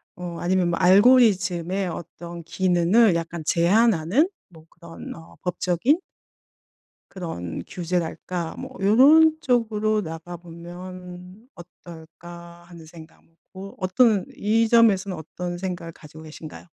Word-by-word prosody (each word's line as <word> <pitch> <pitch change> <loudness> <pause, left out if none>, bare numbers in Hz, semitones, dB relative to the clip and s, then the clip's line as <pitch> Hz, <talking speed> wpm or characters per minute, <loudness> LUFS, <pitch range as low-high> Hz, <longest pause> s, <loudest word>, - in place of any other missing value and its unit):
어 175 -3 -7
아니면 180 0 +1
뭐 170 - -1
알고리즘의 190 -3 +3
어떤 170 +1 -9
기능을 185 +4 +2
약간 170 0 -4
제한하는 200 - +2 0.2
뭐 160 -3 -17
그런 170 -1 -11
어 165 -1 -15
법적인 180 - 0 1.1
그런 90 - -6
규제랄까 175 -1 -4
뭐 265 - -7
'요런 295 +10 +5
쪽으로 215 -5 0
나가보면 180 +3 -10
어떨까.' 170 0 -13
하는 170 -2 -13
생각 160 0 -15
뭐 165 - -33 0.2
고 195 +1 -10
어떤 205 +1 +2
이 225 +2 +1
점에서는 205 -5 +3
어떤 175 +3 -6
생각을 175 -2 -5
가지고 155 +1 -14
계신가요? 155 +2 -11
180 Hz, 255 characters per minute, -23 LUFS, 170-205 Hz, 1.1 s, 요런